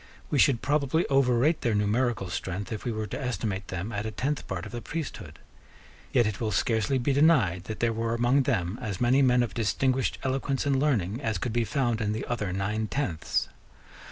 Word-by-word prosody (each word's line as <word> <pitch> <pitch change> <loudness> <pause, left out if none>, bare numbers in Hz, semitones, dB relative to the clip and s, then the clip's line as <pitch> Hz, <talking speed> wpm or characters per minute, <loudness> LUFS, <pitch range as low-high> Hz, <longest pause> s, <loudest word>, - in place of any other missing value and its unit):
We 145 - +2
should 125 -2 +4
probably 145 +2 +1
overrate 135 +3 +3
their 115 -3 +1
numerical 105 -2 0
strength, 95 +5 -4
if 110 - -5
we 120 - 0
were 110 -1 -3
to 105 - -5
estimate 110 -7 -3
them 95 +4 -4
at 105 0 -3
a - - -1
tenth 135 +8 -2
part 90 -2 -4
of - - -8
the 120 0 -5
priesthood. 105 - -6 0.7
Yet 120 - +4
it 105 0 -3
will 110 - 0
scarcely 110 +6 +1
be 130 +2 +1
denied 130 - +3
that 110 - -6
there 115 -1 +2
were 115 +1 -1
among 120 +4 +3
them 110 -6 -1
as 105 -6 -4
many 125 +3 +4
men 125 -2 +4
of 120 - -4
distinguished 130 +3 0
eloquence 135 +1 -1
and 140 -2 +2
learning 120 - 0
as 110 -6 -1
could 115 +4 -3
be 120 -1 +1
found 120 -4 0
in 105 0 0
the 110 - -3
other 105 -6 -2
nine 105 +4 -1
tenths. 100 - -1
115 Hz, 205 wpm, -27 LUFS, 105-135 Hz, 0.7 s, should